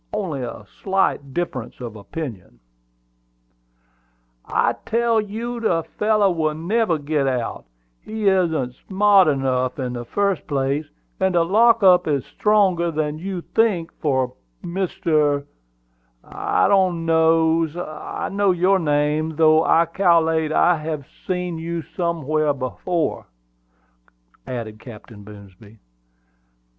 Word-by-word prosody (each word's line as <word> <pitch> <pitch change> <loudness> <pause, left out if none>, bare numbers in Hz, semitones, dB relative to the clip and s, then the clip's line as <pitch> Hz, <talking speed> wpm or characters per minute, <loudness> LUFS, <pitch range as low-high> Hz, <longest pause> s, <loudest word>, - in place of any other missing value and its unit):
Only 180 -10 -3
a 120 -4 -7 0.2
slight 190 -8 0
difference 130 -7 -4
of 120 -3 -7
opinion." 105 - -8 1.8
"I - - +1
tell 230 -1 +1
you 230 +4 -5
the 170 -8 0 0.2
fellow 210 -2 +3
will 155 -3 -1
never 175 +2 0
get 145 -1 -1
out; 125 - -3 0.4
he 215 -1 -3
isn't 160 -10 +1
smart 200 -1 +5
enough 130 -3 0
in 125 -3 -3
the 120 -1 -5
first 200 +7 -1
place, 140 +1 -1 0.3
and 190 -1 +1
the 170 -1 +3
lock 230 +4 +4
up 180 -2 +6
is 140 -3 0
stronger 195 -5 +2
than 155 -1 -2
you 185 0 -4
think 205 -8 +1
for, 130 -4 0 0.3
Mr. 160 -6 0 0.8
I 90 - 0
don't 185 -4 +2
know's 160 0 +2
I 155 -3 -5
know 200 0 +1
your 185 +2 +3
name, 150 0 0
though 155 0 +5
I 165 +1 +4
cal'late 165 -3 +2
I 175 +2 +3
have 155 -2 -5 0.2
seen 180 -2 -2
you 165 0 -4
somewhere 155 -3 -1
afore," 145 +5 -2 1.2
added 110 -4 -6
Captain 110 -2 -12
Boomsby. 100 +1 -15
160 Hz, 120 wpm, -21 LUFS, 140-190 Hz, 1.8 s, up